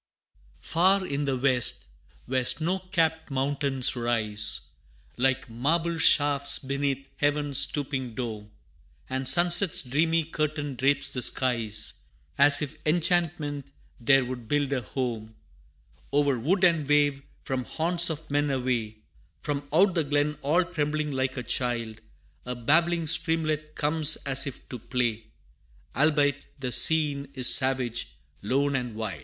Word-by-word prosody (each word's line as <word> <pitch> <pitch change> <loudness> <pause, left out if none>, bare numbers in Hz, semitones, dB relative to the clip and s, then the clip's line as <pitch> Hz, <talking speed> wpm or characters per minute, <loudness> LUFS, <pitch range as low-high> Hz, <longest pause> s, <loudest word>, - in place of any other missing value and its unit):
Far 185 - +2
in 145 -3 -3
the 135 -2 -1
West, 125 - +2 0.4
where 130 0 -1
snow 165 +8 0
capt 165 -4 -1
mountains 135 -1 +1
rise, 110 -3 0 0.5
Like 135 +1 0
marble 160 +8 -1
shafts 145 -2 +3
beneath 135 0 -3
Heaven's 145 -1 +1
stooping 130 -5 -1
dome, 110 -4 -6 0.6
And 130 0 -2
sunset's 175 +4 +3
dreamy 160 +5 +1
curtain 150 -2 -3
drapes 140 +3 +1
the 125 - -4
skies, 115 -5 0 0.3
As 145 +1 +6
if 145 - -7
enchantment 160 -3 -1 0.3
there 130 +2 +3
would 125 -2 -7
build 145 +1 0
her 135 - 0
home 115 -3 -5 0.8
O'er 140 -3 +1
wood 175 - 0
and 165 -5 +3
wave, 145 -1 +2 0.2
from 130 -1 -3
haunts 170 +1 +1
of 160 0 -6
men 145 0 0
away 125 -5 -2 0.5
From 145 -1 -4
out 185 +5 +3
the 165 -2 0
glen, 145 +1 0
all 160 +6 +2
trembling 150 -3 -3
like 130 0 -2
a 125 - -4
child, 115 -2 -3 0.5
A 125 - -3
babbling 165 +7 +1
streamlet 155 -1 -1
comes 155 +1 +2
as 140 0 +3
if 135 - -9
to 125 - -7
play 120 -1 -2 0.7
Albeit 145 -2 +1
the 130 -2 -4
scene 145 -1 +3
is 130 -2 +5
savage, 125 - 0 0.3
lone 140 +7 0
and 125 -4 -4
wild. 105 -7 -5
140 Hz, 135 wpm, -26 LUFS, 125-155 Hz, 0.8 s, As